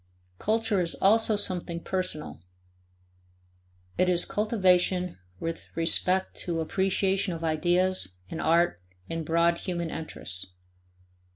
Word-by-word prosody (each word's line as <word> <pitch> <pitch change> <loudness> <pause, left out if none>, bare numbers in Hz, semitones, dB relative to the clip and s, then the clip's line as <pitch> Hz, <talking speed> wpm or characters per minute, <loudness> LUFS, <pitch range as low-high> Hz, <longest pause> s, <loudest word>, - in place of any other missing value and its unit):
Culture 220 -2 +1
is 170 -1 -1
also 220 +2 +4
something 180 -4 -2
personal; 180 - -3 1.6
it 180 - +4
is 175 -1 +3
cultivation 185 - +1 0.2
with 165 0 -5
respect 180 +3 +2
to 170 -2 -1
appreciation 190 +2 0
of 165 0 -6
ideas 175 - +1
and 160 - -5
art 165 - +2 0.3
and 165 0 -2
broad 170 +2 +2
human 170 -3 -3
interests. 95 - -6
175 Hz, 105 wpm, -27 LUFS, 165-190 Hz, 1.6 s, also